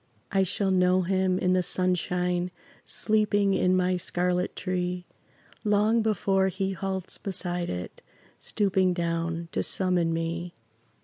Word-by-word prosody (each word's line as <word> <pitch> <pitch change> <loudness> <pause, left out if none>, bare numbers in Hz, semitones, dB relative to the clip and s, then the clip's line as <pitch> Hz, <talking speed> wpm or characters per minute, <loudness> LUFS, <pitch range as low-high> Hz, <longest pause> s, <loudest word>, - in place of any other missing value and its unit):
I 195 - +3
shall 190 +1 0
know 185 0 +3
him, 185 0 +1
in 185 0 +2
the 185 - +3
sunshine 180 0 0 0.3
Sleeping 205 -2 +1
in 185 -1 +3
my 185 0 +2
scarlet 180 +1 -1
tree, 180 -1 -2 0.6
Long 210 +2 +3
before 195 -3 +2
he 190 +1 -2
halts 190 -1 -4
beside 175 -2 -3
it 90 0 -6 0.4
Stooping 190 -3 +1
down 165 -1 -2
to - - 0
summon 180 -3 +1
me. 165 +1 -3
185 Hz, 125 wpm, -27 LUFS, 180-195 Hz, 0.6 s, I